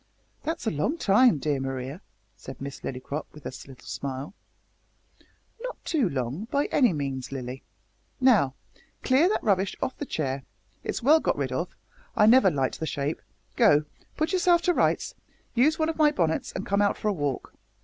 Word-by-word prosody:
"That's 325 -1 -3
a 220 - +1
long 160 - -1
time, 215 - +5
dear 145 0 -1
Maria," 135 +4 -4 0.3
said 135 - -10
Miss 140 0 -6
Lillycrop, 135 +3 -5
with 150 - -14
a - - -5
little 130 -2 -14
smile. 135 +4 -5 1.3
"Not - - -5
too 280 - +1
long, 135 - -3
by 280 +4 0
any 250 -7 +4
means, 135 -5 -3
Lilly. 130 -1 -5 0.6
Now, 215 - +4 0.5
clear 275 +7 +4
that 430 - 0
rubbish 195 -2 +1
off 260 - -2
the 290 - -4
chair 135 -3 -2 0.4
it's - - -3
well 305 +5 +6
got - - 0
rid - - -2
of, - - -3 0.4
I 210 - +5
never 230 -2 +7
liked 135 -5 -1
the 160 - -2
shape 145 +2 -2 0.3
go, 150 +1 +5 0.3
put 315 +4 0
yourself 350 -2 +4
to 355 - +3
rights, - - +1 0.4
use 280 +6 +3
one 315 - +1
of 325 - -2
my 305 -1 +6
bonnets, 165 - 0
and 190 - -5
come 200 +1 +1
out 205 - +2
for - - -3
a - - +1
walk. 145 -7 -3
185 Hz, 180 wpm, -27 LUFS, -, 1.3 s, never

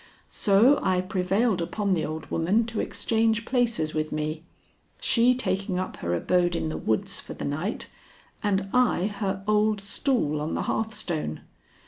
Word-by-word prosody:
So 225 +8 +4
I 185 -1 +2
prevailed 190 +2 +1
upon 200 +3 -1
the 165 - 0
old 155 +1 -5
woman 195 +8 +2
to 225 -1 -4
exchange 225 0 0
places 235 -11 0
with 155 0 -2
me; 155 +1 -2 0.6
she 245 +1 +4
taking 195 -6 -1
up 185 0 -3
her 85 0 -1
abode 175 - +1
in 160 - -1
the - - -4
woods 110 -1 -1
for - - -8
the - - -5
night 155 +9 -3 0.5
and 195 -2 0
I 250 -7 +3
her 195 -2 -2
old 210 0 +3
stool 200 - 0
on 155 - -2
the - - -1
hearthstone. 175 - -2
195 Hz, 155 wpm, -26 LUFS, 160-220 Hz, 0.6 s, So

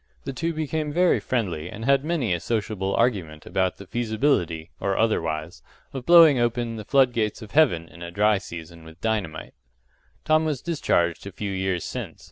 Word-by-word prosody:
The 135 - -5
two 165 +5 -2
became 155 -1 -2
very 175 +3 +3
friendly, 90 -10 -2
and 110 +3 -7
had 140 0 +3
many 150 - 0
a 85 - -1
sociable 105 -2 -2
argument 90 -11 0
about 95 -1 0
the 100 - -10
feasibility 110 - 0
or 100 0 -1
otherwise 80 -7 -1 0.3
of 130 -2 -6
blowing 165 -6 +8
open 120 -1 -1
the 105 - -7
flood 135 -3 +4
gates 110 0 -1
of 105 - -12
Heaven 90 - +3
in 85 - -15
a 85 - -6
dry 105 +3 +2
season 85 -1 -10
with 80 +1 -14
dynamite. 100 -9 -3 0.7
Tom 155 0 +3
was 150 -5 -2
discharged 95 - 0
a - - -6
few 100 +1 -4
years 95 -2 -1
since. - - -6
110 Hz, 180 wpm, -24 LUFS, 85-135 Hz, 0.7 s, blowing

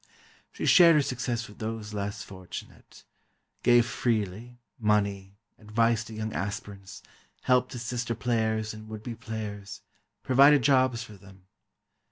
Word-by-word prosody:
She - - -5
shared 170 -3 +7
her 150 - +4
success 120 -3 -3
with 105 - -15
those 110 -1 -5
less 105 +1 -4
fortunate—gave 105 +5 -3
freely, 115 0 -2 0.2
money, 100 -2 0 0.2
advice 115 +1 +1
to 110 - -10
young 110 0 -4
aspirants, 100 -1 -6 0.4
help 125 -1 +3
to - - -7
sister 120 0 -3
players 110 -1 -1
and 110 0 -11
would 110 -1 -8
be 120 - -5
players—provided 110 +6 0
jobs 130 -3 +3
for 110 - -12
them. 95 0 -17
110 Hz, 125 wpm, -28 LUFS, 105-120 Hz, 0.4 s, shared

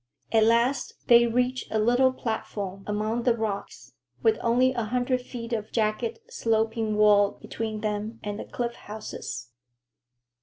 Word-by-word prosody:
At 220 -1 +5
last 235 +3 +2
they 235 0 +7
reached 250 +2 0
a 220 - +1
little 245 +4 +4
platform 205 -5 -4
among 215 +3 -1
the 235 -1 +2
rocks, 210 -3 -4 0.3
with 445 -1 +3
only 250 +2 +3
a 235 -3 -1
hundred 250 +2 0
feet 240 -1 -7
of 215 -1 -3
jagged, 220 +1 0
sloping 225 -1 0
wall 205 -1 +5
between 220 -1 -4
them 215 +1 -3
and 205 0 -4
the - - -5
cliff 240 -1 -3
houses. 205 - -7
225 Hz, 145 wpm, -26 LUFS, 215-240 Hz, 0.3 s, they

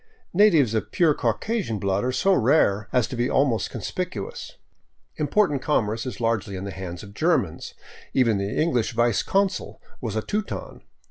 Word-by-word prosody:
Natives 170 - +5
of 110 - -2
pure 165 -4 +3
Caucasian 205 - -1
blood 100 0 0
are 130 - 0
so 195 +9 +2
rare 105 - +3
as 125 -3 +2
to - - -6
be 120 +1 0
almost 130 -5 +1
conspicuous. 170 - -5 0.6
Important 150 -1 +1
commerce 115 -5 0
is 125 - -6
largely 115 -4 -1
in 95 - -5
the 100 - -5
hands 90 -2 -7
of 100 -1 -11
Germans; 155 - 0 0.4
even 115 -6 +2
the 100 +1 -2
English 125 -9 +1
vice 120 -2 +2
consul 195 -1 -1 0.2
was 115 -5 -3
a 110 - -1
Teuton. 210 0 -4
120 Hz, 160 wpm, -24 LUFS, 105-160 Hz, 0.6 s, Natives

